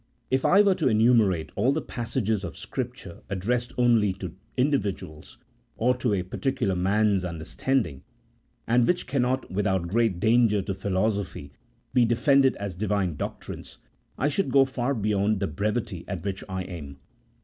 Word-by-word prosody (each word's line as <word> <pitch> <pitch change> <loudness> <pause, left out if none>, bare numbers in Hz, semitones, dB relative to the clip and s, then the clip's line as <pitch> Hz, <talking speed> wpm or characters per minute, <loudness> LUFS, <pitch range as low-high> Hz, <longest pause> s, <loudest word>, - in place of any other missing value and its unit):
If 130 0 +1
I 200 +3 +6
were 200 -2 +4
to 160 -6 0
enumerate 110 -7 +3
all 120 +6 +2
the 150 - 0
passages 115 -6 -2
of 90 - -6
Scripture - - -6
addressed 120 +6 -1
only 115 -5 +3
to 95 -3 -7 0.2
individuals, 100 - -2 0.4
or 125 +3 +2
to 120 -5 +1
a 90 - -1
particular 125 +1 -1
man's 100 +1 +2
understanding, 85 - -2 0.6
and 120 +1 +3
which 180 0 +1
cannot, 130 -3 -1
without 95 -2 0
great 110 -1 +1
danger 110 -2 +3
to 100 - -3
philosophy, 95 -5 -2 0.4
be 125 -1 +5
defended 135 +3 +3
as 100 -2 -5
Divine 95 -2 -1
doctrines, - - -7 0.4
I 140 - +1
should 165 +3 0
go 135 +1 +5
far 130 +1 -2
beyond 105 -1 +1
the 100 - 0
brevity 105 -2 -2
at 95 -4 -5
which 95 -1 -3
I 95 0 -3
aim. 75 -7 -8
105 Hz, 150 wpm, -26 LUFS, 95-125 Hz, 0.6 s, I